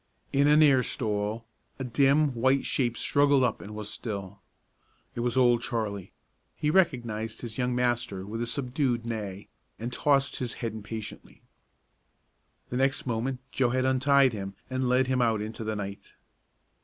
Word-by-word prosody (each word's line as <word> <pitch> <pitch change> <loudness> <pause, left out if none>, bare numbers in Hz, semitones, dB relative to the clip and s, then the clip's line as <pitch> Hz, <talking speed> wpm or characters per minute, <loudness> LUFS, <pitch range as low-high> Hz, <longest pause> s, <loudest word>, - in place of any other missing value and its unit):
In 140 +1 +4
a 150 +1 +6
near 140 -4 +6
stall, 110 -1 -2 0.3
a 135 - -4
dim, 140 +3 +3
white 130 +3 +2
shape 120 -3 0
struggled 140 -2 +3
up 120 -3 0
and 105 +1 -9
was 105 -1 -5
still. 100 -3 -5 0.7
It - - -6
was 120 +1 0
Old 120 -2 +4
Charlie. 110 -6 -3 0.4
He 150 - 0
recognized 120 - +1
his 115 -2 -6
young 125 0 0
master 120 -6 -1
with 115 +3 -5
a 120 - -1
subdued 125 -1 -1
neigh, 105 -4 -5 0.3
and 120 +2 -5
tossed 140 0 +2
his 125 -2 -3
head 115 -3 -4
impatiently. 110 0 -8 1.3
The 125 - -2
next 135 +1 +1
moment 125 +2 -2
Joe 130 -2 +2
had 130 +1 +1
untied 130 0 +4
him, 95 -2 -5 0.2
and 130 -1 0
led 130 +1 +3
him 130 -1 +1
out 115 -3 +2
into 110 +2 -5
the 110 0 -2
night. 100 -1 -7
120 Hz, 160 wpm, -28 LUFS, 110-130 Hz, 1.3 s, a